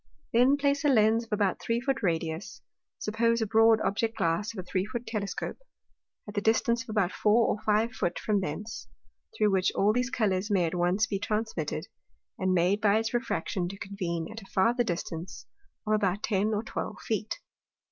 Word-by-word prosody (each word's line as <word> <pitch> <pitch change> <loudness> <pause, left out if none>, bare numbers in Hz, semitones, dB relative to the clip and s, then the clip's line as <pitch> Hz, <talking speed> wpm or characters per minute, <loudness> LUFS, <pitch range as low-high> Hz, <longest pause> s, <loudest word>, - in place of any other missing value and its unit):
Then 250 +5 +5
place 280 +1 +1
a - - +3
Lens 225 -3 +4
of 230 - -27
about 205 -3 +1
three 230 0 0
Foot 270 +1 -1
Radius 165 -1 -2 0.4
(suppose 230 +2 +1
a 220 - +1
broad 225 +1 +5
Object 225 +3 -1
glass 190 +4 0
of 225 - -13
a 185 - -4
three 185 +1 -1
Foot 235 +3 -5
Telescope,) 205 -3 -4 0.7
at 205 - -7
the 205 - -1
distance 230 +2 +2
of 255 - -11
about 205 -4 +1
four 220 +2 +3
or 210 - -1
five 215 +2 +2
Foot 180 -6 -1
from 205 -2 0
thence, 205 +8 -5 0.5
through 210 -1 +3
which 190 -1 +2
all 205 +2 +3
those 250 +2 0
Colours 205 -5 0
may 190 -4 +3
at 160 - -2
once 180 +4 +2
be 200 -3 -3
transmitted, 210 -7 -2 0.5
and 185 0 +1
made 185 +3 +2
by 205 0 +4
its 225 +1 -1
Refraction 185 -6 -1
to 195 - -8
convene 180 -5 -4
at 225 +1 -8
a - - -13
farther 235 +6 +3
distance 170 -3 -5 0.4
of 215 - +1
about 205 -2 +1
ten 205 -1 +1
or 215 0 -1
twelve - - -5
Feet. - - -2
210 Hz, 190 wpm, -28 LUFS, 185-225 Hz, 0.7 s, Then